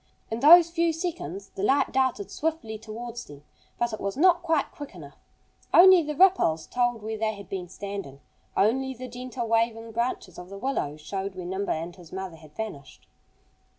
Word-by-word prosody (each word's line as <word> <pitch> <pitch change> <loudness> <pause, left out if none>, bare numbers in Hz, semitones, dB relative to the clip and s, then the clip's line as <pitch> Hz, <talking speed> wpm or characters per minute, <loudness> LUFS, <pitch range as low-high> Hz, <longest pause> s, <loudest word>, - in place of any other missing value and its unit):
In 225 - -2
those 335 +5 +8
few 335 -1 +1
seconds 200 - -5
the - - -7
light 270 +8 +2
darted 260 -6 0
swiftly 295 -9 -3
towards 235 +2 -7
them. 145 0 -13 0.3
But 240 -1 -1
it 215 - -4
was 200 +2 -3
not 350 +2 +5
quite 325 -4 0
quick 290 -8 -9
enough. 145 -5 -12 0.6
Only 370 0 +9
the 300 -1 -4
ripples 295 - +4
told 240 -3 0
where 220 0 -4
they 220 -1 0
had 200 -2 -11
been 185 -3 -5
standing. 195 -10 -7 0.4
Only 265 +6 +2
the 255 +1 -7
gently 250 0 -5
waving 230 0 0
branches 225 -6 -3
of 180 0 -10
the 200 - -8
willows 175 - -2
showed 195 +4 -4
where 180 -1 -6
Nimble 190 +3 -1
and 165 +2 -6
his 175 -4 -15
mother 190 -3 -6
had 155 -1 -17
vanished. 210 -11 -7
220 Hz, 185 wpm, -26 LUFS, 190-265 Hz, 0.6 s, Only